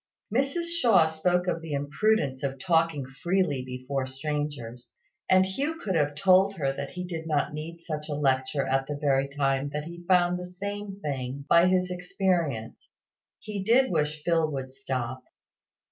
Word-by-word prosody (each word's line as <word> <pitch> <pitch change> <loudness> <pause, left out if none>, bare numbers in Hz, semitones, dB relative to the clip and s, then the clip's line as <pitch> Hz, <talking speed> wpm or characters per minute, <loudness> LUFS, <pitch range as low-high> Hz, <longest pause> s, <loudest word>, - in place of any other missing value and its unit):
Mrs 275 +7 +1
Shaw 240 - +4
spoke 175 +3 +1
of 175 -2 -1
the 160 -2 -6
imprudence 145 0 +1
of 135 -1 -2
talking 165 -1 +1
freely 150 +1 0
before 130 +1 -3
strangers; 135 -3 -5 0.3
and 185 0 +6
Hugh 280 +12 -2
could 195 - -2
have 145 -3 +1
told 190 +4 +4
her 135 -6 0
that 140 0 -5
he 180 - -6
did 165 -2 -5
not 150 -2 0
need 165 +3 -7
such 155 -2 -5
a 145 - -1
lecture 135 -1 +1
at 135 0 0
the 145 - -3
very 140 -2 +2
time 140 0 0
that 150 0 -2
he 170 +2 -9
found 180 -1 +3
the 180 - -6
same 200 +2 -6
thing 135 -2 -4
by 170 +1 +6
his 185 0 +2
experience. 180 - -1 0.5
He 210 -2 -4
did 250 +6 +4
wish 150 -2 -1
Phil 165 -2 +2
would 130 -2 -5
stop. 130 -1 -4
155 Hz, 165 wpm, -27 LUFS, 135-180 Hz, 0.5 s, and